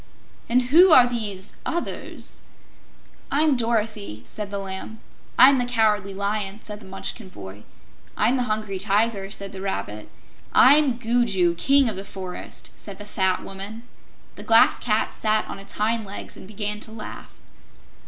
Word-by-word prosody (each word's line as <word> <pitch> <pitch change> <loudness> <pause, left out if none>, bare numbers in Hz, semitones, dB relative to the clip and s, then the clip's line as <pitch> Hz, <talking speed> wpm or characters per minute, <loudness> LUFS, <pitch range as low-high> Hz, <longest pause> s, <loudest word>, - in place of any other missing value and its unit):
"And 250 +2 +3
who 360 +4 +8
are 255 -5 +9
these 210 -6 -3
others?" 345 +1 -4 0.9
"I'm 295 0 +3
Dorothy," 220 - -2
said 210 -2 -6
the 200 - -4
Lamb. 195 +3 -6 0.4
"I'm 265 +2 +8
the - - +2
Cowardly 210 -5 +1
Lion," 200 0 -2
said 210 -1 -6
the 215 - -14
Munchkin 195 +2 -6
boy. 100 - -10 0.5
"I'm 245 - +3
the 250 -3 -1
Hungry 215 -3 -2
Tiger," 200 0 +1
said 200 -1 -6
the 190 - -8
Rabbit. 105 - -4 0.4
"I'm 275 -2 +6
Gugu, 225 -7 +2
King 275 +10 +3
of 220 - -2
the 195 - -4
Forest," 190 -2 -8
said 200 -2 -9
the 205 - -9
fat 190 -2 0
Woman. 200 +4 -8 0.5
The - - -7
Glass 225 0 +5
Cat 215 -2 0
sat 215 0 +1
on - - -7
its 195 - -9
hind 220 +2 0
legs 200 0 -7
and - - -11
began 210 0 -3
to 220 - -7
laugh. 220 -1 -9
210 Hz, 155 wpm, -24 LUFS, 195-235 Hz, 0.9 s, are